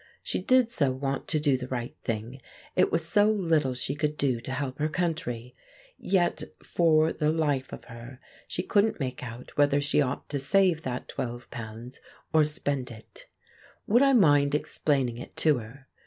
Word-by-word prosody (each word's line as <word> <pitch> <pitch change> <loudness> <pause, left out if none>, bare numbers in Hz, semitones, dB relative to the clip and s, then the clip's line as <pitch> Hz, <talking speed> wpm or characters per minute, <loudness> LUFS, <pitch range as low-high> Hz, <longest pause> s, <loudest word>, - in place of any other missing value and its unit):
She - - -2
did 255 -2 +3
so 145 - +1
want 135 +1 -3
to 155 - +1
do 145 -3 +2
the 125 0 -6
right 120 -2 -4
thing; 115 +3 -4 0.3
it - - +3
was 165 -1 0
so 205 +4 +4
little 165 -10 +1
she 125 +2 -2
could 150 +1 -2
do 130 -4 0
to 130 - -6
help 135 0 -3
her 155 +1 +1
country. 125 -9 -3 0.4
Yet, 180 -2 +1 0.2
for 160 -2 +3
the 150 0 +1
life 145 -5 0
of - - -8
her, 120 +2 -11 0.3
she 180 - -2
couldn't 210 +1 +2
make 130 -3 -3
out 120 0 -9
whether 145 0 +4
she 145 +1 +2
ought 135 -1 -2
to 145 - -2
save 175 +3 +3
that 125 -4 -4
£12 120 0 -7 0.3
or 160 -1 +6
spend 145 -3 -2
it. 110 -2 -13 0.6
Would 235 +5 +4
I 275 -1 +5
mind 145 - +4
explaining 135 -5 0
it - - -10
to 150 -5 +3
her? 130 +5 -12
140 Hz, 175 wpm, -27 LUFS, 125-160 Hz, 0.6 s, or